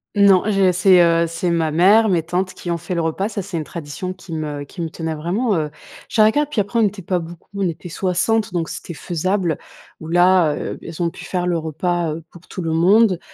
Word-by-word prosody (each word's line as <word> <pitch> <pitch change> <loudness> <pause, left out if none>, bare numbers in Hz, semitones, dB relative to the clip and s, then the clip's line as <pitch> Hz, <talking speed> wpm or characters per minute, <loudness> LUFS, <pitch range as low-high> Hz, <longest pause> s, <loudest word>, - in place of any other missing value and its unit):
Non, 200 -2 +5
j'ai 195 -3 +3
c'est, 185 0 +5
heu, 170 0 +3
c'est 170 +2 -2
ma 165 -2 +1
mère, 200 +8 +5
mes 175 -4 +2
tantes 180 +3 -2
qui 175 - -5
ont 170 - 0
fait 170 +2 -5
le 170 - 0
repas, 165 +5 -1
ça, 205 -3 -4
c'est 190 -3 -5
une 160 - -2
tradition 170 +4 -6
qui 185 -2 -11
me 150 -2 -4
qui 170 +5 -9
me 165 - -2
tenait 160 0 -4
vraiment, 185 +10 -1
heu, 155 -3 -1 0.4
je - - -8
dirais 215 0 +6
qu'a 295 +4 +1
puis 285 -6 -2
après, 205 +4 0
on - - +4
n'était 205 -1 0
pas 180 +1 0
beaucoup, 170 0 -11
on 200 -2 0
était 170 +2 -7
60 190 +5 0
donc 170 -2 -1
c'était 170 - -7
faisable, 175 +1 -1 0.4
ou 160 - -9
là, 175 -2 +4
heu, - - -4
beh, - - -11
elles 165 +1 -6
ont 170 - +1
pu - - -11
faire 180 -1 -2
le 175 -1 +1
repas, 165 +1 -1
heu, 160 +1 -7
pour 175 - -14
tout 185 - -6
le 165 - -1
monde, 185 +4 +4
175 Hz, 245 wpm, -20 LUFS, 165-195 Hz, 0.4 s, dirais